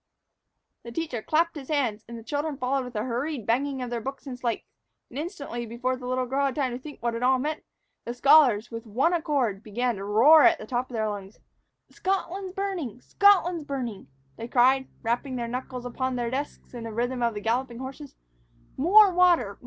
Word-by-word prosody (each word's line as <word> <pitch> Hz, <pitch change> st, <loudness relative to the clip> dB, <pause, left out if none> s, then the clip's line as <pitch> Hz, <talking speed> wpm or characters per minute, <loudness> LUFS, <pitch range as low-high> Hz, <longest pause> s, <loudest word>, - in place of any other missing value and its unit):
The 235 Hz, -, -9 dB
teacher 255 Hz, -4 st, -3 dB
clapped 335 Hz, +7 st, +1 dB
his 275 Hz, -4 st, -8 dB
hands, 245 Hz, -8 st, 0 dB
the 230 Hz, -1 st, -9 dB
children 290 Hz, +4 st, -3 dB
followed 260 Hz, +1 st, -1 dB
with 250 Hz, -1 st, -10 dB
a 210 Hz, -, -1 dB
hurried 255 Hz, +1 st, -3 dB
banging 265 Hz, +2 st, 0 dB
of 245 Hz, -, -6 dB
their 235 Hz, -1 st, -2 dB
books 270 Hz, +4 st, -6 dB
and 265 Hz, -3 st, -5 dB
slates, 240 Hz, -2 st, -3 dB, 0.4 s
and, 260 Hz, -, -5 dB
instantly, 285 Hz, -7 st, -5 dB
before 250 Hz, +3 st, -2 dB
the 250 Hz, -1 st, -8 dB
little 255 Hz, 0 st, 0 dB
girl 275 Hz, +3 st, 0 dB
had 270 Hz, -, -3 dB
time 270 Hz, -4 st, 0 dB
to 245 Hz, -, -5 dB
think 290 Hz, -2 st, -11 dB
what 235 Hz, -1 st, 0 dB
it 230 Hz, -, -4 dB
all 260 Hz, +1 st, +4 dB
meant, 300 Hz, +4 st, -3 dB, 0.4 s
the 235 Hz, -, -5 dB
scholars, 250 Hz, -5 st, +5 dB
with 230 Hz, 0 st, -7 dB
one 260 Hz, +11 st, +1 dB
accord, 275 Hz, -, 0 dB
began 235 Hz, +1 st, -2 dB
to 195 Hz, -, -6 dB
roar 235 Hz, +10 st, +6 dB
at 340 Hz, 0 st, +6 dB
the 215 Hz, -, -9 dB
top 245 Hz, +2 st, -2 dB
of 245 Hz, -, -7 dB
their 220 Hz, -1 st, 0 dB
lungs. 205 Hz, -1 st, -6 dB, 0.5 s
"Scotland's 380 Hz, 0 st, -2 dB
burning! 370 Hz, -, -3 dB
Scotland's 360 Hz, -2 st, +3 dB
burning!" 250 Hz, -, -5 dB, 0.3 s
they 230 Hz, -, -6 dB
cried, 260 Hz, +2 st, +3 dB, 0.2 s
rapping 240 Hz, +3 st, -1 dB
their 240 Hz, -1 st, -3 dB
knuckles 250 Hz, +1 st, -5 dB
upon 260 Hz, +1 st, -2 dB
their 240 Hz, -1 st, -2 dB
desks 280 Hz, +1 st, -5 dB
in 235 Hz, -2 st, -6 dB
the 225 Hz, -, -5 dB
rhythm 245 Hz, +3 st, -2 dB
of 235 Hz, -2 st, +1 dB
galloping 240 Hz, +1 st, -1 dB
horses, 265 Hz, +3 st, -8 dB, 0.6 s
"More 380 Hz, +7 st, +6 dB
water! 345 Hz, -, +3 dB
255 Hz, 200 wpm, -26 LUFS, 235-295 Hz, 0.6 s, roar